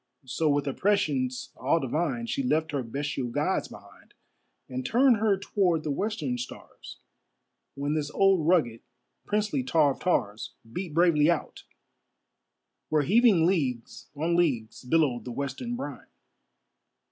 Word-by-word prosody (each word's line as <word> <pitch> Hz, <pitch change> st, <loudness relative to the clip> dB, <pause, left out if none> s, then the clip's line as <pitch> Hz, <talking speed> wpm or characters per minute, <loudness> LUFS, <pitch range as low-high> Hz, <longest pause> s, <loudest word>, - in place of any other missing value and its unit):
So 150 Hz, +5 st, 0 dB
with 145 Hz, 0 st, +1 dB
a 140 Hz, -, -2 dB
prescience 140 Hz, -11 st, 0 dB
all 145 Hz, +6 st, +1 dB
divine, 170 Hz, -, -2 dB
She 245 Hz, +4 st, -2 dB
left 160 Hz, -, 0 dB
her 140 Hz, -2 st, -1 dB
bestial 135 Hz, +2 st, -3 dB
gods 120 Hz, -, -1 dB
behind, -, -, -16 dB, 0.5 s
And 130 Hz, 0 st, -4 dB
turned 245 Hz, -, +4 dB
her 210 Hz, -2 st, +2 dB
toward 180 Hz, -5 st, 0 dB
the 150 Hz, -, -2 dB
western 150 Hz, -, -2 dB
stars, 125 Hz, -, -9 dB, 0.8 s
When 140 Hz, +2 st, -2 dB
this 150 Hz, -2 st, -1 dB
old 190 Hz, -2 st, +3 dB
rugged, 135 Hz, -11 st, +2 dB, 0.5 s
princely 210 Hz, -9 st, 0 dB
tar 145 Hz, +3 st, +3 dB
of -, -, -7 dB
tars 110 Hz, -, -1 dB, 0.2 s
Beat 180 Hz, -2 st, -5 dB
bravely 165 Hz, -3 st, +4 dB
out, 170 Hz, -, -2 dB, 1.2 s
where 155 Hz, -1 st, +2 dB
heaving 200 Hz, -, +4 dB
leagues 135 Hz, -10 st, -1 dB
on 165 Hz, +4 st, 0 dB
leagues 130 Hz, -12 st, 0 dB
Billowed 130 Hz, -2 st, +1 dB
the 125 Hz, -, -6 dB
western 140 Hz, -, -4 dB
brine. 260 Hz, -, -7 dB
155 Hz, 135 wpm, -27 LUFS, 130-190 Hz, 1.2 s, turned